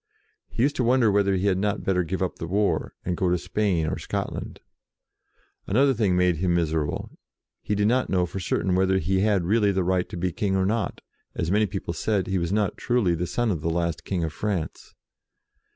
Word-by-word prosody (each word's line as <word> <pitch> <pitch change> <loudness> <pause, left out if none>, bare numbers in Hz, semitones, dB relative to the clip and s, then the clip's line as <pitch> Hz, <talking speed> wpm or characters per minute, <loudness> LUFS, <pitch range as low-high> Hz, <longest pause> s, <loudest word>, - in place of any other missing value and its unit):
He 115 - -1
used 140 +1 +2
to 125 - +1
wonder 120 -2 +4
whether 100 -1 +2
he 95 +1 -1
had 95 -2 +2
not 105 0 -1
better 90 -2 +1
give 95 +3 -2
up 90 - -3
the 80 - -4
war, 100 +4 0
and 90 - -1
go 90 +1 0
to 90 - +2
Spain 95 -3 0
or 80 - -2
Scotland. - - -4 1.1
Another 135 +6 +3
thing 105 -6 +1
made 90 -2 +3
him 90 +1 +1
miser 80 -2 +1
able. - - -6 0.4
He 105 - -1
did 105 +1 +2
not 125 +3 +1
know 90 -2 +2
for 95 +3 -6
certain 95 +1 0
whether 95 +1 +3
he 95 +2 0
had 100 -3 +2
really 105 +2 +3
the 95 -1 0
right 90 0 0
to - - -6
be 90 +1 -1
King 95 +3 -1
or 95 0 +2
not, 110 +2 -1 0.3
as 85 - -1
many 105 +1 +3
people 95 -4 -4
said 100 +2 0
that 95 - -6
he 95 - +1
was 85 0 -2
not 105 -1 0
truly 120 -8 +1
the 85 +1 -2
son 120 +4 0
of 85 -6 -2
the 85 - -1
last 85 -1 -1
King 90 -3 -2
of 80 -1 -3
France. 100 -7 -4
95 Hz, 225 wpm, -25 LUFS, 90-105 Hz, 1.1 s, wonder